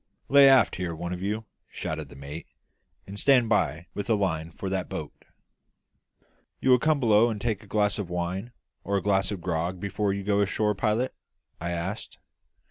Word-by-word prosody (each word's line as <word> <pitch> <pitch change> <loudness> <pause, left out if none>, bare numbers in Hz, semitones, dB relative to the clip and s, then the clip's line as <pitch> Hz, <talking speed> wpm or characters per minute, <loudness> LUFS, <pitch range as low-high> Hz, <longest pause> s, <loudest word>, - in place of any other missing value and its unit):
"Lay 140 0 +8
aft 135 -1 +5
here, 90 -2 -3
one 85 +2 -4
of 90 - -6
you," 105 +3 -2 0.2
shouted 80 -3 -5
the - - -13
mate, 70 +4 -8 0.6
"and 100 +1 -8
stand 130 -4 +4
by 85 -6 +1
with 100 +4 -5
a 110 - +4
line 85 -6 -1
for 90 +4 -7
that 95 -1 -2
boat." - - -5 1.5
"You 130 - +2
will 125 - +7
come 155 +2 +2
below 115 -2 +4
and 110 -2 -3
take 110 -2 -2
a 105 - -16
glass 105 0 +1
of 95 -4 -4
wine 90 +6 -3 0.3
or 100 0 0
a 95 - -2
glass 95 -2 +2
of 100 -4 -4
grog 85 +1 -2
before 100 +1 -1
you 100 0 -3
go 100 0 +2
ashore, 105 +1 +1
pilot?" 110 +5 0 0.5
I 85 - -3
asked. 85 +5 -4
100 Hz, 190 wpm, -27 LUFS, 90-110 Hz, 1.5 s, Lay